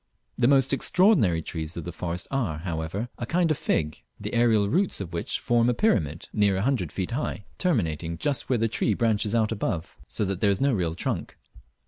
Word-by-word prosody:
The 120 - +2
most 135 0 +4
extraordinary 135 - +3
trees 80 0 -5
of 85 - -4
the 90 - -5
forest 85 +1 -4
are, 115 - -1
however, 85 +6 -3
a 120 - -3
kind 170 +1 +2
of 155 - +1
fig, 75 -1 -1 0.2
the - - -5
aerial 115 -4 +3
roots 185 - +1
of 90 -4 -6
which 85 - -2
form 120 0 +2
a 125 - +1
pyramid 85 - +1
near 100 -2 +3
a 95 - 0
hundred 120 - 0
feet 95 +1 -3
high, 120 -5 -3
terminating 85 - 0
just 145 - -1
where 130 - +3
the 115 0 +1
tree 110 -1 0
branches 110 -1 +1
out 110 -1 +2
above, 85 -6 -3
so 105 - -1
that 95 -1 -3
there 105 - +4
is 100 - +1
no 140 -1 +2
real 85 -6 -1
trunk. - - -3
105 Hz, 205 wpm, -26 LUFS, 85-125 Hz, 0.2 s, most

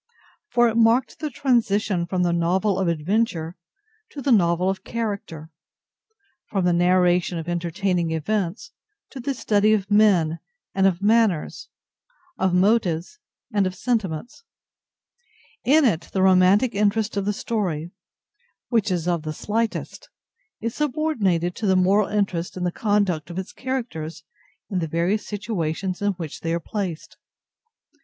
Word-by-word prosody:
For 240 0 +4
it 230 0 -1
marked 230 +3 +3
the 305 - -3
transition 215 -9 +1
from 180 +1 0
the 175 -1 +1
novel 185 +4 +1
of 190 - 0
adventure 170 0 -1 0.5
to 290 - -9
the 275 0 0
novel 175 -4 +3
of 190 0 -2
character—from 205 - -7
the 175 - +3
narration 180 0 +2
of 165 0 -6
entertaining 175 0 -1
events 190 - -2 0.4
to 270 - -8
the 270 +2 -2
study 215 -2 +2
of 205 -1 -1
men 185 -7 +4 0.3
and 195 0 +3
of 190 0 -1
manners, 215 -6 +1 0.7
of 190 -1 +2
motives 185 - +1 0.3
and 200 -2 +2
of 185 - -5
sentiments. 225 - -3 1.2
In 300 +3 +4
it 170 -8 0
the 190 - +1
romantic 190 +6 +4
interest 210 +1 +1
of 200 -1 -1
the 205 - +1
story 180 -7 -3 0.8
(which 225 -4 +1
is 175 -2 -1
of 170 -2 +1
the 155 0 -5
slightest) 230 - -3 0.5
is 230 0 -3
subordinated 245 - 0
to 215 - -2
the 190 - +4
moral 190 +3 +3
interest 195 -4 -2
in 180 - -3
the 175 - 0
conduct 200 -6 0
of 175 - -7
its 190 0 -5
characters 230 - -5 0.4
in 190 -4 -2
the 165 - -2
various 175 +7 -1
situations 190 -4 -3
in 205 0 +1
which 165 -5 -7
they 165 0 -1
are - - -1
placed. 180 -3 -5
195 Hz, 145 wpm, -23 LUFS, 175-220 Hz, 1.2 s, For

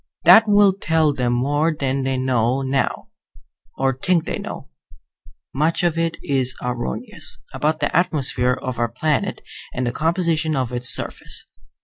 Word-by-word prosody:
That 225 0 +8
will 205 -1 +5
tell 160 -5 +1
them 125 -3 0
more 145 +6 +1
than 135 -3 -2
they 135 0 -1
know 130 0 +1
now 135 0 -1 0.7
(or 135 0 +1
think 165 +6 0
they - - -3
know; - - -7 0.9
much 155 +6 +1
of 170 -2 +2
it 165 0 -1
is 130 -2 +1
erroneous) 120 - -3 0.2
about 155 +1 -1
the - - -1
atmosphere 135 -7 +1
of 130 -2 -4
our 120 -1 +1
planet 150 +5 -1 0.3
and 125 - -1
the 120 - 0
composition 160 +1 0
of 130 -3 -1
its 125 0 0
surface. - - -1
135 Hz, 150 wpm, -21 LUFS, 125-160 Hz, 0.9 s, That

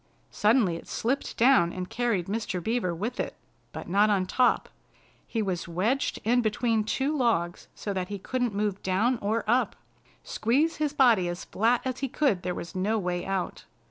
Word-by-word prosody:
Suddenly 210 -5 +3
it - - -12
slipped 265 +5 -2
down 235 -8 +5
and 180 0 -5
carried 225 -7 0
Mr. 205 -2 -2
Beaver 220 -6 0
with 220 +8 -4
it, - - -3 0.4
but - - -7
not 205 +4 +3
on 195 -3 +2
top. 250 +7 +2 0.6
He 225 -2 -1
was 185 -4 -3
wedged 205 +11 0
in 245 +3 +3
between 225 0 +1
two 270 +7 -1
logs 220 - 0
so 205 - -4
that 185 -1 -2
he 205 +1 -5
couldn't 245 +2 -2
move 205 -1 -1
down 220 +7 +1
or 215 +2 0
up. 240 -1 +2 0.5
Squeeze 285 +9 +1
his 300 -1 -1
body 235 -10 +4
as 175 +1 -5
flat 235 +4 +1
as 260 0 -2
he 270 - -1
could 245 -10 +1
there 180 0 -3
was 170 - -7
no 200 +4 0
way 180 -3 -2
out. 195 -2 -3
215 Hz, 180 wpm, -27 LUFS, 185-245 Hz, 0.6 s, down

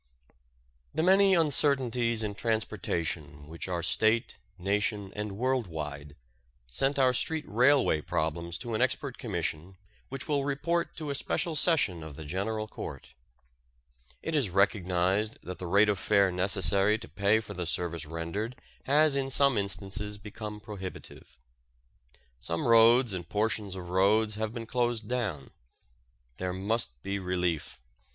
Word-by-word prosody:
The 160 - +1
many 195 +1 +5
uncertainties 130 -7 +2
in 105 -1 -2
transportation 85 -9 -2
which 80 +3 -6
are 90 -2 -2
State, 110 +7 +2 0.2
Nation, 100 +1 -1
and 105 -1 -4
world 130 -2 0
wide, 75 -3 -6 0.6
sent 135 - +1
our 130 -2 +4
street 160 +4 +2
railway 125 - +3
problems 85 +1 -2
to 120 - -4
an 110 - 0
expert 130 +1 0
commission 90 - -3 0.3
which 135 0 -5
will 145 -3 +1
report 170 +5 -1
to 155 -3 -4
a - - -1
special 160 +4 0
session 145 - +2
of 80 -3 -8
the 80 - -8
General 110 +7 -2
Court. - - -8 1.1
It - - -3
is 140 -9 +1
recognized 95 +2 +1
that 90 0 -7
the 90 - -5
rate 100 +4 +5
of 105 -3 +1
fare 100 -3 +3
necessary 95 +3 +2
to - - -10
pay 100 +2 +2
for 110 - -8
the 90 -2 -4
service 85 -2 -3
rendered 85 +9 -4 0.3
has 150 +1 +4
in 135 -1 -1
some 140 0 +3
instances 100 +1 -2
become 105 0 -8
prohibitive. 100 -3 -9 1.0
Some 85 - -2
roads 115 0 +6
and 90 -2 -6
portions 105 -2 0
of 90 -2 -7
roads 105 +4 +3
have 110 0 -3
been 115 -1 -6
closed 120 -2 -1
down. 110 - -3 0.9
There 90 0 -3
must 95 - -2
be 100 0 -2
relief. 90 -7 -2
105 Hz, 145 wpm, -29 LUFS, 90-120 Hz, 1.1 s, roads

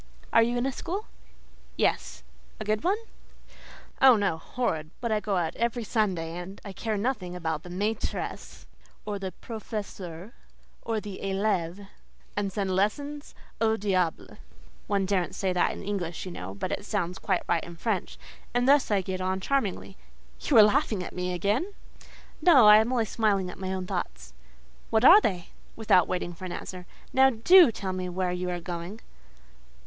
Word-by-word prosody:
"Are 230 - +7
you 240 +2 +1
in 240 - 0
a 270 - 0
school?" 370 - -4 0.7
"Yes." - - 0 0.4
"A 215 - -5
good 215 +1 0
one?" 390 +4 +2 1.0
"Oh, 265 -2 +8
no! 200 -6 0
horrid: 160 -7 -2
but 235 -2 -2
I 215 - +2
go 205 -2 -1
out 165 -2 -1
every 235 0 -1
Sunday, 185 -7 -1
and 180 +3 -8 0.2
care 220 -2 -2
nothing 200 -5 -2
about 160 -3 -2
the 175 - -11
maîtresses 205 +5 -4 0.4
or 205 -1 -3
the 190 -1 -4
professeurs, 200 -5 -7 0.5
or 225 -1 -2
the 205 -2 -8
élèves, 195 -1 -1 0.5
and 200 -1 -1
send 190 -1 -1
lessons 285 +10 -2 0.3
au 220 0 +3
diable 185 -5 -1 0.5
(one 200 -1 +1
daren't 185 -2 -1
say 190 -2 -1
that 180 - +2
in - - -8
English, 185 -5 -3
you 185 - -6
know, 95 - -7
but - - -4
it - - -3
sounds 190 -4 -2
quite 190 -3 0
right 170 -1 +1
in 170 - -9
French); 205 +2 -2 0.4
and 245 +1 +2
thus 285 -1 +5
I 205 -2 +2
get 185 0 -4
on 185 +1 -1
charmingly…. 200 -5 -2 0.4
You 275 - +2
are 215 - +11
laughing 210 -3 +2
at - - -8
me 180 0 -2
again?" 210 - -1 0.7
"No—I 240 -12 +8
am 220 +3 +2
only 240 -3 +1
smiling 200 -4 0
at - - -12
my 190 0 -3
own 190 -1 -3
thoughts." 60 - -5 0.6
"What 220 +2 +3
are 395 +8 +10
they?" 180 - -2 0.3
(Without 205 -6 +3
waiting 175 -1 -3
for 180 +2 -9
an 180 - -5
answer)—"Now, 190 +8 0
do 275 +6 +7
tell 190 -3 -4
me 185 -1 -3
where 180 0 -1
you 180 0 -3
are 175 0 -2
going." 175 +4 -6
200 Hz, 170 wpm, -27 LUFS, 180-225 Hz, 1.0 s, are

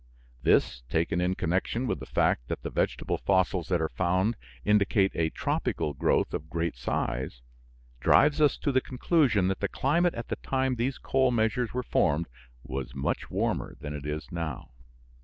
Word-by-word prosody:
This, 60 - +3
taken 80 +4 +1
in 90 +1 +1
connection 95 +10 -1
with - - -1
the - - -8
fact - - +1
that - - -4
the - - -4
vegetable - - -1
fossils 95 -2 +1
that 90 -2 +1
are 80 - 0
found 95 +5 +1 0.3
indicate 100 -1 +3
a 80 -1 +1
tropical 80 -1 -1
growth 65 - +1
of 80 - -4
great 85 0 -2
size, - - -3 0.6
drives 145 - +4
us 150 - +4
to 145 - -1
the 130 0 +3
conclusion 130 - +2
that 95 - -2
the - - 0
climate 170 +6 +1
at 115 - -6
the - - -2
time 130 -1 0
these 130 +3 -1
coal 130 -1 +2
measures 120 0 0
were 125 - -1
formed 80 -7 +1 0.4
was 65 -1 -5
much 65 0 -2
warmer - - -1
than 75 0 -5
it 75 0 -6
is 75 +3 -4
now. 80 -8 -5
95 Hz, 175 wpm, -28 LUFS, 80-125 Hz, 0.6 s, drives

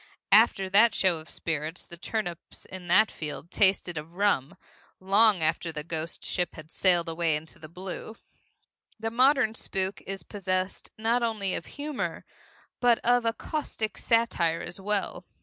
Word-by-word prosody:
After 195 -1 +5
that 210 +5 +5
show 180 -4 +2
of 155 - -13
spirits, 160 +1 -3
the 170 - -11
turnips 175 -1 -5
in 185 -1 -9
that 210 +5 +5
field 155 +3 -7
tasted 190 -4 +2
of 160 +3 -12
rum, 195 -9 +1 0.4
long 200 -1 +4
after 165 +1 +1
the 150 -1 -6
ghost 165 0 -5
ship 180 -1 -2
had 155 0 -11
sailed 175 -3 +2
away 165 -1 0
into 155 +2 -8
the 155 - -11
blue. 185 +5 -7 0.8
The 225 0 -2
modern 255 -1 +4
spook 190 -3 -2
is 195 0 -4
possessed 185 -2 -2
not 230 +3 +1
only 215 -5 0
of - - -4
humor 290 -1 -4 0.5
but 240 -2 +4
of 245 0 +4
a 230 - +2
caustic 225 -7 -3
satire 210 -8 +1
as 175 - -7
well. 205 0 -1
190 Hz, 155 wpm, -28 LUFS, 165-220 Hz, 0.8 s, After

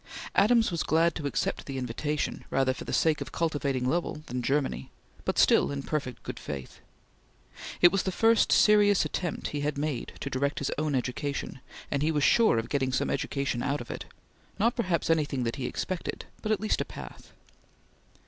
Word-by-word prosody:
Adams 225 0 +4
was 170 - -1
glad 165 +2 +3
to 150 -4 -3
accept - - -2
the 135 -1 -4
invitation, 130 +4 -2
rather 135 -1 +2
for - - -8
the - - -5
sake 155 -2 +2
of - - -5
cultivating 140 -6 -1
Lowell 155 0 -1
than 125 +1 -3
Germany, 135 - -1 0.4
but - - -1
still - - +5
in 140 -1 -4
perfect 135 -6 -3
good - - -6
faith. 70 -3 -7 1.0
It 175 - +8
was 195 - +1
the 190 - -2
first 225 +3 +3
serious 205 -2 +5
attempt 175 -4 -3
he 145 - -3
had 145 0 -1
made 145 -4 -3
to 140 - -4
direct 140 +2 0
his 140 - -1
own 155 -2 0
education, 130 +2 -3 0.3
and 140 - 0
he 155 +2 +2
was 150 -2 0
sure 225 - +5
of 115 +1 -1
getting 135 -2 0
some - - 0
education 140 -4 -1
out 140 +3 0
of 120 - -7
it; - - -6 0.5
not 230 +4 +2
perhaps 185 -8 0
anything 145 -5 +1
that 115 +3 -2
he 130 -2 -2
expected, 185 -2 -4 0.2
but 215 - -2
at 215 - +2
least 215 - 0
a - - -2
path. - - -11
145 Hz, 190 wpm, -28 LUFS, 135-170 Hz, 1.0 s, It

